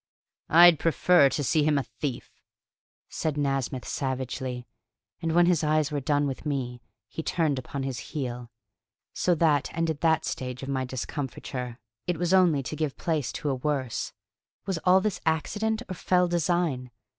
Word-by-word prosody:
"I'd 170 -1 +8
prefer 165 -2 +4
to 145 +2 -2
see 155 +4 +2
him 150 0 +3
a 140 - +1
thief!" 135 -2 -5 0.8
said 155 -2 -2
Nasmyth 135 -3 -1
savagely; 130 -2 -3 0.6
and 165 -1 -1
when 175 +1 +5
his 175 -3 +2
eyes 155 0 +2
were 145 - -1
done 145 +1 +1
with 135 -2 -4
me, 125 -5 -3 0.3
he 140 - -5
turned 160 -5 0
upon 135 +2 -5
his 135 -2 -3
heel. 125 -1 -5 0.6
So 180 - +2
that 150 -4 +2
ended 160 -3 -1
that 160 -1 +3
stage 125 0 -4
of 135 - -5
my 130 -1 -1
discomfiture. 125 -1 -5 0.3
It 175 -2 0
was 175 +2 0
only 170 -7 +4
to 140 - -5
give 155 -4 -2
place 155 -7 -1
to 145 - -2
a - - +1
worse. 130 -2 -2 0.5
Was 190 -4 -2
all 185 +1 +6
this 210 -1 -2
accident 215 +8 0
or - - -4
fell 180 0 +2
design? 170 -6 0
150 Hz, 165 wpm, -27 LUFS, 130-165 Hz, 0.8 s, I'd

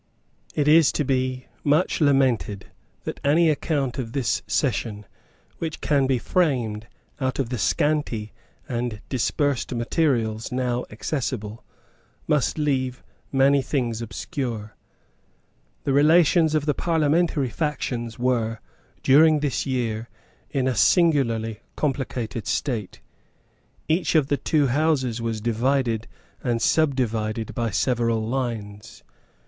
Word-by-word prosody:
It 145 -1 +1
is 155 0 +7
much - - -2
to 150 - 0
be 130 -1 -1 0.2
lamented 135 - +2 0.4
that - - -5
any 155 +3 +4
account 140 -3 -1
of 115 -3 -5
this 135 -4 0
session 105 -2 -1 0.5
which 160 -2 -4
can 140 -3 +2
be 130 -1 +2
framed 120 -9 0 0.3
out 130 -1 -1
of 135 -4 -1
the 125 -2 -3
scanty 115 - 0 0.3
and 120 -4 -3
dispersed 135 0 0
materials 115 -4 0
now 125 -1 -1
accessible 110 -2 -4 0.6
must 150 0 +1
leave 130 -4 -1 0.3
many 140 +1 +4
things 120 -5 -2
obscure. 115 - -5 1.1
The 140 - 0
relations 160 +2 +4
of 150 -1 +1
the 150 - +2
parliamentary 160 -3 +1
factions 125 -7 -3
were, 115 -3 0 0.4
during 155 +2 +6
this 125 -8 -1
year, 120 -3 -2 0.4
in 135 -3 0
a 130 - +1
singularly 115 - +2 0.2
complicated 125 -6 -2
state. 115 -9 -2 0.9
Each 165 +1 +1
of 150 -3 +3
the 145 - +2
two 150 0 +1
Houses 130 -4 +1
was 115 -2 -2
divided 120 0 0 0.4
and 120 -2 0
subdivided 115 -7 0
by 115 -1 -1
several 115 0 0
lines. 115 -5 -4
130 Hz, 115 wpm, -24 LUFS, 115-145 Hz, 1.1 s, is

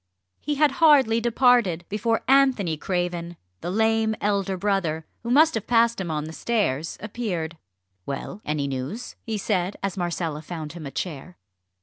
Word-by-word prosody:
He 295 - -2
had 295 0 +4
hardly 270 -8 +6
departed 235 -7 +3
before 225 +2 0
Anthony 260 -11 +4
Craven, 175 0 -3 0.2
the 175 - -4
lame 220 +2 +2
elder 195 -2 0
brother, 175 -5 0 0.2
who 235 - -5
must 310 +6 +5
have 225 - -3
passed 235 -2 +3
him 175 - -4
on 155 -1 -1
the 160 +1 -7
stairs, 165 - -1
appeared. 195 -7 -3 0.5
"Well 160 +8 -5
any 150 -2 -1
news?" 140 - -5
he 225 -3 -3
said, 195 -2 -1
as 195 -2 -2
Marcella 170 -3 -2
found 160 -1 -6
him 165 -4 -7
a - - -7
chair. 175 +2 -5
195 Hz, 155 wpm, -24 LUFS, 165-230 Hz, 0.5 s, hardly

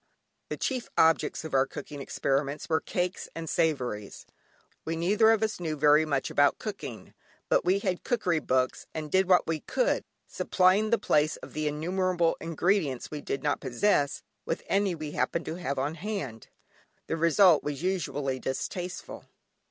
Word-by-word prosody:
The - - -3
chief 255 -3 -2
objects 160 0 +3
of 160 - -7
our 135 0 +3
cooking 145 +1 -8
experiments 140 +2 -1
were 160 -1 +1
cakes 180 +1 -3
and 165 0 -5
savouries. 125 - -1 0.6
We 165 - -2
neither 200 +7 +3
of 225 -1 +3
us 215 -3 -1
knew 160 -3 -2
very 150 +1 +5
much 140 -3 -1
about 145 0 +3
cooking, 210 -2 -7 0.4
but - - +3
we 185 +2 +3
had 185 -3 -2
cookery 185 -10 +1
books, 130 -3 0
and 155 -2 -5
did 190 0 +3
what 180 -1 +5
we 160 -1 -1
could, - - 0 0.2
supplying 190 +4 +2
the 235 - +4
place 150 -5 +2
of - - -12
the 155 0 -1
innumerable 175 +3 0
ingredients 165 -4 0
we 150 -1 -5
did 135 - -4
not 145 -1 0
possess, 140 +2 +1 0.2
with - - -3
any 195 -2 +1
we 155 -2 -6
happened 170 - -1
to 160 - -4
have 140 -6 -3
on 140 +4 -1
hand. 160 - -5 0.6
The - - -2
result 170 0 +5
was 145 +1 -4
usually 145 -8 -1
distasteful. 175 +8 -5
160 Hz, 165 wpm, -28 LUFS, 145-185 Hz, 0.6 s, very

